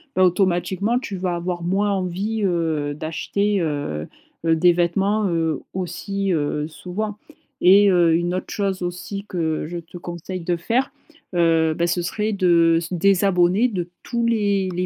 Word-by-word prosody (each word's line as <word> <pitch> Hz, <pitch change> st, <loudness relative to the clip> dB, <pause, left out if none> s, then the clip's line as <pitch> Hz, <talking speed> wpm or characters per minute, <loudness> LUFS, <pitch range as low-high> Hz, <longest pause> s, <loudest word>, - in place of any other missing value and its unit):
bah, 185 Hz, -, +4 dB
automatiquement, 185 Hz, +4 st, +1 dB
tu 220 Hz, -6 st, -6 dB
vas 180 Hz, -1 st, -1 dB
avoir 175 Hz, 0 st, -3 dB
moins 195 Hz, +4 st, +1 dB
envie, 195 Hz, +3 st, -2 dB
heu, 160 Hz, -5 st, 0 dB
d'acheter, 195 Hz, +7 st, -1 dB
heu 145 Hz, -, -3 dB, 0.4 s
heu, 165 Hz, 0 st, +4 dB
des 175 Hz, +2 st, +5 dB
vêtements, 195 Hz, +5 st, +1 dB
heu, 165 Hz, -3 st, 0 dB
aussi, 195 Hz, +2 st, -3 dB
heu, 150 Hz, -1 st, -1 dB
souvent 200 Hz, +6 st, -5 dB, 0.4 s
et 200 Hz, +3 st, +6 dB
heu, 175 Hz, -3 st, +4 dB
une 175 Hz, +1 st, 0 dB
autre 185 Hz, -, -4 dB
chose 195 Hz, -3 st, -1 dB
aussi 180 Hz, +3 st, -5 dB
que 160 Hz, -5 st, -2 dB
je 175 Hz, +2 st, -5 dB
te 170 Hz, +1 st, -11 dB
conseille 175 Hz, +1 st, -6 dB
de 175 Hz, +1 st, -1 dB
faire, 235 Hz, +10 st, 0 dB, 0.4 s
heu, 165 Hz, -2 st, +3 dB
bah, 170 Hz, +2 st, 0 dB
ce 175 Hz, +1 st, 0 dB
serait 210 Hz, +5 st, -1 dB
de 170 Hz, -4 st, +4 dB
se 170 Hz, +2 st, -6 dB
désabonner 190 Hz, +3 st, +3 dB
de 180 Hz, -7 st, -4 dB
tous 235 Hz, -1 st, -1 dB
les 200 Hz, -4 st, +1 dB
les 180 Hz, +1 st, 0 dB
180 Hz, 160 wpm, -22 LUFS, 170-200 Hz, 0.4 s, et